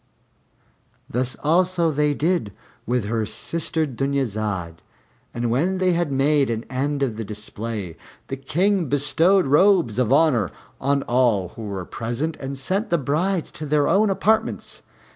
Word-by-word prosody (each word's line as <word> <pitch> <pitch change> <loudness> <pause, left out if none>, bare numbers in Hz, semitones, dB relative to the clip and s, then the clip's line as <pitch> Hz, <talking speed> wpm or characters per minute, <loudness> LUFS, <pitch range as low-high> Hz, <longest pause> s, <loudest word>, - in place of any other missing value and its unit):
Thus 125 +2 -1
also 170 +1 +3
they 150 0 +1
did 155 - 0 0.3
with 120 -2 0
her 110 +1 -1
sister 160 +4 -2
Dunyazad; 110 - -2 0.5
and 120 -1 -2
when 175 +10 +1
they 185 -1 +2
had 170 -3 0
made 140 0 +2
an 115 -1 -2
end 140 +2 -1
of 115 -5 -2
the 115 - -3
display, 105 -3 -5 0.3
the 135 - -3
King 180 +7 +1
bestowed 165 +6 +3
robes 150 - +4
of 125 -2 +1
honor 135 - +3 0.3
on 140 +1 +1
all 120 -7 +2
who 110 +4 -9
were 95 -3 -4
present, 120 - -3
and 135 0 -6
sent 190 - -1
the 170 - +3
brides 165 +6 -1
to 155 - -6
their 145 0 +2
own 205 +2 +3
apartments. 220 +3 0
140 Hz, 145 wpm, -23 LUFS, 115-165 Hz, 0.5 s, robes